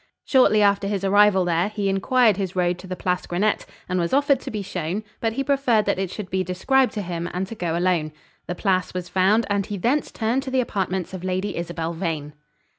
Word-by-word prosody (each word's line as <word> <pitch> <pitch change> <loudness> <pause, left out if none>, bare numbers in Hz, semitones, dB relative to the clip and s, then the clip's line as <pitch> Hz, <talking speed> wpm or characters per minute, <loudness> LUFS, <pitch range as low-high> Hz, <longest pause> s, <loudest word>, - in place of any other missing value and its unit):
Shortly 215 -6 +4
after 200 0 +3
his 200 -1 -2
arrival 195 -1 +4
there, 175 +3 +1
he 210 -2 -2
inquired 210 +3 +3
his 190 -2 -3
road 180 -1 +1
to 190 - -10
the 185 - -4
Place 180 0 -2
Grenette, 200 +5 0 0.2
and 185 0 -1
was 170 +5 -1
offered 280 -1 +3
to - - -7
be 210 -2 -4
shown: 180 +2 -3 0.2
but 225 -1 -1
he 275 - -1
preferred 270 -6 +2
that 200 -2 0
it 190 -2 -1
should 185 -1 -7
be 190 0 +1
described 250 +9 +2
to 210 - -3
him, 175 -1 -4
and 185 +1 -1
to 195 - -8
go 170 -6 -2
alone. 175 -3 +1 0.4
The 175 - -3
Place 185 -2 0
was 180 -1 -4
found, 195 +5 +3
and 200 -1 0
he 205 - -4
thence 255 +10 0
turned 230 +4 0
to 270 - -6
the 260 0 +1
apartments 190 -6 -2
of 185 -1 -6
Lady 185 +2 -2
Isabel 170 -1 -3
Vane. 160 -4 -3
190 Hz, 225 wpm, -23 LUFS, 180-215 Hz, 0.4 s, Shortly